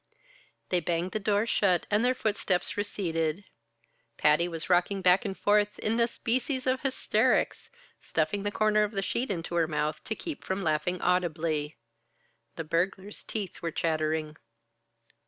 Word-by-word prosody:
They 180 Hz, -, +2 dB
banged 170 Hz, +2 st, -1 dB
the 215 Hz, -, -2 dB
door 205 Hz, +1 st, +1 dB
shut 190 Hz, -6 st, +2 dB
and 210 Hz, +3 st, +3 dB
their 255 Hz, +1 st, +3 dB
footsteps 205 Hz, -6 st, -1 dB
receded. 170 Hz, -4 st, -2 dB, 0.7 s
Patty 150 Hz, +3 st, +4 dB
was 165 Hz, -2 st, -5 dB
rocking 185 Hz, +2 st, +2 dB
back 180 Hz, +3 st, +5 dB
and 195 Hz, -2 st, -3 dB
forth 205 Hz, 0 st, +2 dB
in 225 Hz, +2 st, 0 dB
a 235 Hz, -, +4 dB
species 255 Hz, +3 st, -1 dB
of 260 Hz, 0 st, +1 dB
hysterics, 270 Hz, -1 st, +1 dB, 0.3 s
stuffing 160 Hz, +6 st, -1 dB
the 205 Hz, -, -1 dB
corner 215 Hz, 0 st, +3 dB
of 210 Hz, +1 st, 0 dB
the 195 Hz, -1 st, -1 dB
sheet 240 Hz, +6 st, -1 dB
into 175 Hz, -3 st, -3 dB
her 170 Hz, -2 st, +2 dB
mouth 150 Hz, 0 st, -2 dB
to 220 Hz, -, -2 dB
keep 320 Hz, +4 st, -6 dB
from 190 Hz, +1 st, -2 dB
laughing 155 Hz, +3 st, 0 dB
audibly. 165 Hz, -4 st, 0 dB, 0.8 s
The 165 Hz, -, -4 dB
burglar's 185 Hz, +5 st, -2 dB
teeth 205 Hz, -5 st, -5 dB
were 170 Hz, -, -1 dB
chattering. 155 Hz, -1 st, -1 dB
185 Hz, 155 wpm, -28 LUFS, 165-210 Hz, 0.8 s, back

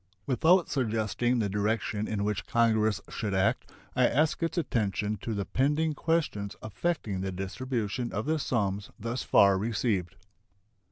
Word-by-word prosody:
Without 165 Hz, -, +4 dB
suggesting 120 Hz, -1 st, 0 dB
the 110 Hz, -3 st, +1 dB
direction 105 Hz, +1 st, -1 dB
in 105 Hz, -2 st, -2 dB
which 105 Hz, -3 st, -2 dB
Congress 110 Hz, -3 st, +2 dB
should 100 Hz, -3 st, -3 dB
act, 95 Hz, 0 st, +1 dB, 0.2 s
I -, -, +5 dB
ask 155 Hz, +4 st, +1 dB
its 165 Hz, +2 st, -1 dB
attention 105 Hz, -, 0 dB
to 115 Hz, -, -3 dB
the 100 Hz, -1 st, -2 dB
pending 150 Hz, +6 st, +1 dB
questions 150 Hz, -12 st, -1 dB
affecting 110 Hz, -, -2 dB
the 95 Hz, 0 st, -2 dB
distribution 115 Hz, +4 st, -3 dB
of 105 Hz, +3 st, -3 dB
the 160 Hz, 0 st, +1 dB
sums 100 Hz, -7 st, -1 dB
thus 115 Hz, +3 st, -3 dB
far 100 Hz, -1 st, +5 dB
received. 100 Hz, -4 st, -1 dB
110 Hz, 145 wpm, -29 LUFS, 100-130 Hz, 0.2 s, I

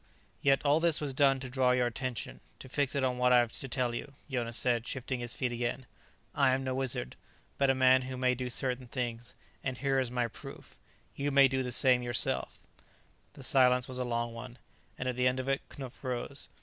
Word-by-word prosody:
"Yet 135 Hz, +1 st, +3 dB
all 145 Hz, +2 st, +4 dB
this 165 Hz, -2 st, +2 dB
was 145 Hz, -3 st, -3 dB
done 135 Hz, 0 st, +3 dB
to 130 Hz, -, -5 dB
draw 125 Hz, 0 st, +2 dB
your 125 Hz, -1 st, +2 dB
attention, 120 Hz, -, -4 dB, 0.2 s
to -, -, -11 dB
fix 135 Hz, +2 st, 0 dB
it 140 Hz, -, 0 dB
on 125 Hz, -1 st, 0 dB
what 125 Hz, 0 st, +4 dB
I 125 Hz, -, +7 dB
have 120 Hz, -2 st, +2 dB
to 135 Hz, -, -4 dB
tell 125 Hz, -2 st, -1 dB
you," 140 Hz, +4 st, -6 dB, 0.2 s
Jonas 120 Hz, -2 st, -1 dB
said, 120 Hz, -2 st, +2 dB
shifting 130 Hz, -1 st, -3 dB
his 120 Hz, -1 st, -3 dB
feet 125 Hz, -2 st, -1 dB
again. 120 Hz, +2 st, -3 dB, 0.5 s
"I 140 Hz, -3 st, +3 dB
am 135 Hz, -, -3 dB
no 130 Hz, -1 st, -2 dB
wizard, 130 Hz, -, -1 dB, 0.4 s
but 140 Hz, -1 st, +3 dB
a 135 Hz, -, +4 dB
man 130 Hz, 0 st, +5 dB
who 130 Hz, 0 st, -6 dB
may 125 Hz, 0 st, +2 dB
do 125 Hz, 0 st, -4 dB
certain 125 Hz, 0 st, -2 dB
things. 120 Hz, -2 st, -4 dB, 0.3 s
And 130 Hz, -2 st, -3 dB
here 135 Hz, 0 st, +1 dB
is 130 Hz, -2 st, -1 dB
my 120 Hz, -1 st, 0 dB
proof: 115 Hz, -, -11 dB, 0.4 s
you 145 Hz, +1 st, -1 dB
may 140 Hz, -1 st, +6 dB
do 130 Hz, 0 st, -1 dB
the 125 Hz, -1 st, -3 dB
same 125 Hz, 0 st, +4 dB
yourself." 120 Hz, -1 st, 0 dB, 0.7 s
The 135 Hz, -, -11 dB
silence 125 Hz, -1 st, +4 dB
was 130 Hz, 0 st, -6 dB
a -, -, 0 dB
long 120 Hz, -1 st, -2 dB
one, 120 Hz, +1 st, -9 dB, 0.4 s
and 130 Hz, -, -3 dB
at 125 Hz, -, -1 dB
the 125 Hz, 0 st, +2 dB
end 125 Hz, +1 st, +1 dB
of 130 Hz, -, -4 dB
it 135 Hz, 0 st, 0 dB
Knupf 130 Hz, -2 st, -9 dB
rose. 130 Hz, +2 st, -4 dB
130 Hz, 225 wpm, -31 LUFS, 120-135 Hz, 0.7 s, I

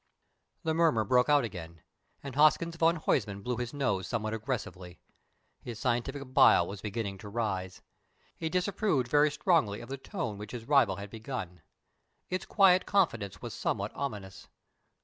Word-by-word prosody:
The 160 Hz, -, 0 dB
murmur 160 Hz, -9 st, +3 dB
broke 125 Hz, +5 st, +3 dB
out 145 Hz, -2 st, +5 dB
again, 85 Hz, -7 st, -8 dB, 0.4 s
and 140 Hz, -2 st, -6 dB
Hoskins 155 Hz, +3 st, +3 dB
van 165 Hz, +1 st, +3 dB
Huysman 100 Hz, -, -1 dB
blew 125 Hz, +1 st, -2 dB
his 120 Hz, -1 st, -3 dB
nose 105 Hz, -10 st, -1 dB
somewhat 110 Hz, -2 st, -2 dB
aggressively. 105 Hz, -7 st, -5 dB, 0.6 s
His 120 Hz, -3 st, -7 dB
scientific 130 Hz, +3 st, -2 dB
bile -, -, +6 dB
was 100 Hz, 0 st, -7 dB
beginning 105 Hz, -2 st, -4 dB
to 105 Hz, -, -9 dB
rise. 95 Hz, -5 st, -3 dB, 0.5 s
He 160 Hz, -, -3 dB
disapproved 180 Hz, -, 0 dB
very 150 Hz, +3 st, +4 dB
strongly 150 Hz, -, +1 dB
of 120 Hz, -, -10 dB
the 135 Hz, -, -4 dB
tone 135 Hz, -, -5 dB
which 105 Hz, +2 st, -8 dB
his 115 Hz, -2 st, -6 dB
rival 135 Hz, -9 st, +4 dB
had 100 Hz, +1 st, -8 dB
begun. 110 Hz, -, -6 dB, 0.7 s
Its 185 Hz, -, -2 dB
quiet 185 Hz, -3 st, +4 dB
confidence 115 Hz, -, 0 dB
was -, -, -5 dB
somewhat -, -, -2 dB
ominous. 100 Hz, -9 st, -6 dB
120 Hz, 155 wpm, -30 LUFS, 100-150 Hz, 0.7 s, bile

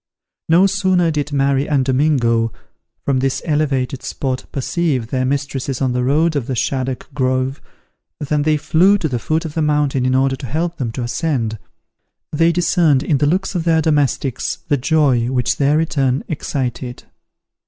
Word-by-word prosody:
No 170 Hz, +4 st, +5 dB
sooner 185 Hz, -3 st, +2 dB
did 150 Hz, -1 st, -2 dB
Mary 140 Hz, 0 st, +1 dB
and 140 Hz, -3 st, +2 dB
Domingo, 125 Hz, -5 st, +2 dB, 0.5 s
from 135 Hz, -2 st, +1 dB
this 135 Hz, 0 st, 0 dB
elevated 140 Hz, -4 st, 0 dB
spot, 130 Hz, -2 st, -3 dB
perceive 140 Hz, -4 st, -1 dB
their 130 Hz, -1 st, 0 dB
mistresses 135 Hz, -1 st, -2 dB
on 130 Hz, -2 st, +1 dB
the 125 Hz, 0 st, -1 dB
road 155 Hz, +5 st, +2 dB
of 135 Hz, -4 st, -2 dB
the 130 Hz, -, -2 dB
Shaddock 130 Hz, +1 st, -2 dB
Grove, 130 Hz, 0 st, -1 dB, 0.6 s
than 145 Hz, 0 st, 0 dB
they 155 Hz, +1 st, +2 dB
flew 180 Hz, +7 st, +3 dB
to 175 Hz, -, -1 dB
the 125 Hz, -4 st, -2 dB
foot 160 Hz, +6 st, -1 dB
of 155 Hz, -, -5 dB
the 160 Hz, -, -1 dB
mountain 150 Hz, -3 st, +1 dB
in 130 Hz, 0 st, +1 dB
order 135 Hz, 0 st, +2 dB
to 130 Hz, -, -7 dB
help 165 Hz, +6 st, -2 dB
them 120 Hz, -4 st, -3 dB
to 125 Hz, -, -4 dB
ascend. 120 Hz, -4 st, -2 dB, 0.7 s
They 165 Hz, +2 st, +3 dB
discerned 170 Hz, -5 st, +2 dB
in 145 Hz, -4 st, +1 dB
the 145 Hz, -, +2 dB
looks 185 Hz, +5 st, 0 dB
of 175 Hz, -3 st, -1 dB
their 165 Hz, -1 st, +3 dB
domestics 145 Hz, -5 st, 0 dB
the 145 Hz, -, +4 dB
joy 135 Hz, -4 st, +2 dB
which 125 Hz, -1 st, 0 dB
their 145 Hz, +2 st, +2 dB
return 140 Hz, -5 st, 0 dB
excited. 125 Hz, -5 st, -4 dB
140 Hz, 170 wpm, -18 LUFS, 130-155 Hz, 0.7 s, No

